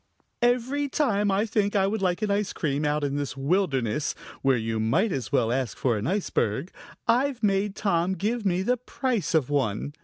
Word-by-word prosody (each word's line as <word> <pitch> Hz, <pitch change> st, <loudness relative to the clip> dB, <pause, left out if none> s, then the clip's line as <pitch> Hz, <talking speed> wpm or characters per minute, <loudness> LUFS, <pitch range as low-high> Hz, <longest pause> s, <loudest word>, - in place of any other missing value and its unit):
Every 250 Hz, +4 st, +1 dB
time 210 Hz, -9 st, +1 dB
I 200 Hz, +2 st, +2 dB
think 210 Hz, -2 st, 0 dB
I 195 Hz, -1 st, +4 dB
would 205 Hz, +1 st, -1 dB
like 185 Hz, +2 st, 0 dB
an 210 Hz, -, +1 dB
ice 205 Hz, 0 st, 0 dB
cream, 150 Hz, -1 st, -1 dB
out 150 Hz, 0 st, 0 dB
in 140 Hz, 0 st, -1 dB
this 140 Hz, -1 st, -3 dB
wilderness, 140 Hz, -, 0 dB, 0.3 s
where 135 Hz, -2 st, +3 dB
you 110 Hz, 0 st, -2 dB
might 160 Hz, -, +2 dB
as 135 Hz, -5 st, -3 dB
well 115 Hz, -5 st, +2 dB
ask 130 Hz, -2 st, -1 dB
for 125 Hz, -3 st, +1 dB
an 105 Hz, +2 st, -2 dB
iceberg, 175 Hz, -, -1 dB, 0.4 s
I've 250 Hz, +1 st, +2 dB
made 195 Hz, 0 st, +1 dB
Tom 180 Hz, -2 st, +1 dB
give 220 Hz, +4 st, -1 dB
me 185 Hz, -2 st, +1 dB
the 250 Hz, +5 st, +1 dB
price 245 Hz, -6 st, -2 dB
of 145 Hz, -3 st, +2 dB
one. 135 Hz, -1 st, -1 dB
190 Hz, 190 wpm, -26 LUFS, 140-210 Hz, 0.4 s, I